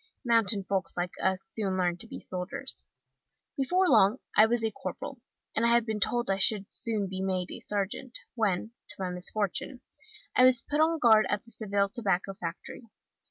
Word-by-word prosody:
Mountain 225 -4 +4
folks 190 -3 -2
like 175 +1 -1
us 190 0 +1
soon 195 -1 -3
learn 175 -2 +1
to 225 - -7
be - - -8
soldiers. 180 +1 -5 0.7
Before 360 +7 +2
long 220 - +5 0.2
I 215 - +7
was 235 0 0
a 220 - 0
corporal, - - -7 0.3
and 220 - +1
I 235 - +4
had 235 -1 +4
been 220 -2 -2
told 240 +3 0
I 195 0 0
should 200 +1 +2
soon 215 -4 -2
be 190 0 -5
made 185 -1 -2
a - - -7
sergeant, 210 +5 -3 0.2
when, 220 -2 0 0.2
to - - +2
my 185 -2 -3
misfortune, 210 +8 -2 0.5
I 255 - +6
was 255 -2 +5
put 295 - -2
on 325 +1 +3
guard 220 -7 +5
at 205 +2 -1
the 230 - -16
Seville 200 -3 0
Tobacco 195 -3 -1
Factory. 180 +6 -7
210 Hz, 185 wpm, -29 LUFS, 190-235 Hz, 0.7 s, I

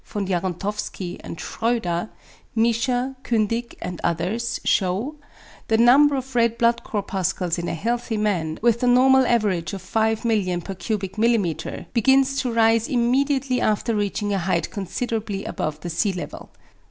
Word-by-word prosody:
Jaruntowski 190 -1 -3
and 165 - -7
Schroeder, 220 -6 -1 0.5
Miescher, 245 +3 +1
Kündig 230 +1 -1
and 180 -1 -5
others, 180 +8 -1
shew, 205 +11 0 0.5
the 220 - +3
number 275 +5 +6
of 265 0 -5
red 235 -1 +2
blood 235 0 +2
corpuscles 190 -4 -2
in 170 - -3
a - - -2
healthy 230 +4 -2
man, 175 -7 -1
with 235 -1 +3
the 250 - +1
normal 260 +1 +5
average 205 -7 +1
of 195 -2 -6
5,000,000 220 -3 0
per 195 - -5
mm.^, 210 -2 -1
begins 265 +3 +3
to 250 - -2
rise 225 0 +3
immediately 260 +1 +1
after 215 +2 +1
reaching 205 0 -1
a 195 - +1
height 170 -1 -1
considerably 210 0 -3
above 155 0 -3
the 175 - -5
sea 195 +5 0
level. 180 - -7
220 Hz, 140 wpm, -23 LUFS, 190-240 Hz, 0.5 s, number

